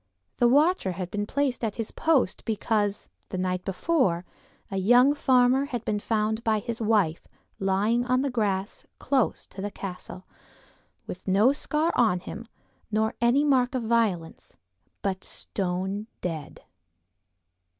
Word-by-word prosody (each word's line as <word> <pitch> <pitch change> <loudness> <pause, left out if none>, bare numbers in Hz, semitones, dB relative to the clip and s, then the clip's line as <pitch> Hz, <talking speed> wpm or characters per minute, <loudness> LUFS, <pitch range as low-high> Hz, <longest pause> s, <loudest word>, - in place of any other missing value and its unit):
The 240 - +4
Watcher 290 - +3
had 180 0 -5
been 205 0 -2
placed 275 -2 -1
at 220 -2 -1
his 225 -2 -4
post 290 - +1
because, 210 -2 -1 0.2
the 185 - -4
night 185 0 -1
before, 195 - 0 0.5
a 195 - -2
young 245 +8 +5
farmer 260 -1 +3
had 245 -5 -5
been 210 -1 0
found 220 +1 -1
by 220 -1 +2
his 230 +3 -4
wife 205 -7 +1 0.3
lying 200 +5 +1
in 255 0 +2
the 280 - -1
grass 200 -4 -1
close 260 -2 0
to 190 - -10
the 205 - -2
Castle, 185 -1 -8 0.8
with 185 - -8
no 205 +8 +4
scar 305 +3 0
on 215 -7 +3
him, 225 +5 -8 0.4
nor 220 0 0
any 240 +5 +4
mark 260 -3 +2
of 250 - -1
violence, 220 -8 -1 0.5
but 190 -1 -2
stone 190 +2 -3
dead. 160 -5 -5
220 Hz, 140 wpm, -26 LUFS, 190-250 Hz, 0.8 s, young